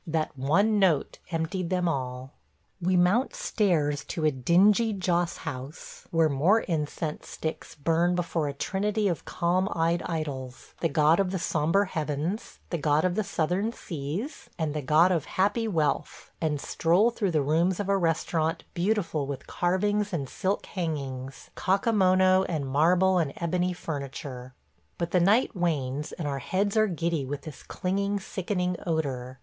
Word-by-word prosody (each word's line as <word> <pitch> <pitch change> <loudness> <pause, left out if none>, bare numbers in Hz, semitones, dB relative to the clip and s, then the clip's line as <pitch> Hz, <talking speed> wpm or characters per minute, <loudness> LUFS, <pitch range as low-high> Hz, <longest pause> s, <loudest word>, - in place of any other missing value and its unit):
That 155 -2 -1
one 195 +11 +2
note 175 -7 +2
emptied 170 +2 -2
them 180 -1 +1
all.... 130 -3 -3 0.5
We 180 +1 +2
mount 205 - +3
stairs 165 - +1
to 160 - -3
a 155 - +4
dingy 195 - +3
Joss 175 -3 0
house, 140 -1 -7
where 165 -1 +3
more 160 +10 +3
incense 155 -1 -3
sticks 160 0 -5
burn 165 +4 +1
before 170 -3 -1
a 140 - -3
trinity 205 +7 -1
of 175 -4 -2
calm 185 +3 0
eyed 170 +1 +1
idols 135 -6 -5
– - - -28
the 165 - +2
God 155 +3 +4
of 195 -2 +2
the 190 - -2
Sombre 165 +3 +1
Heavens, 155 +5 -3
the 170 - -1
God 150 +2 +2
of 180 - +1
the 215 +3 0
Southern 180 +5 0
Seas, 170 - -5
and 155 -3 -1
the 150 - -2
God 155 +6 +4
of 165 -5 0
Happy 205 +4 +1
Wealth 155 -8 -1
– - - -39
and 150 -3 0
stroll 180 +11 +2
through 210 -4 -1
the 155 -4 +1
rooms 170 +6 +2
of 205 - -2
a 200 - +3
restaurant 165 -2 0
beautiful 175 -6 0
with 140 -2 -5
carvings 205 +4 0
and 145 -7 -2
silk 190 +9 -2
hangings, 135 -7 -5
Kakamono 190 -2 +3
and 155 -5 -1
marble 175 +7 +3
and 155 -5 -1
ebony 180 +2 0
furniture.... 135 -5 -6 0.4
But 170 -1 -2
the 180 - +4
night 210 +7 +3
wanes 150 -5 -1
and 165 -4 -4
our 140 -1 -2
heads 200 - -1
are 215 0 +4
giddy 170 -4 -1
with 140 +2 -5
this 155 -4 -9
clinging, 200 +2 -1
sickening 180 -2 -2
odor. 135 -6 -2
170 Hz, 165 wpm, -27 LUFS, 150-190 Hz, 0.5 s, a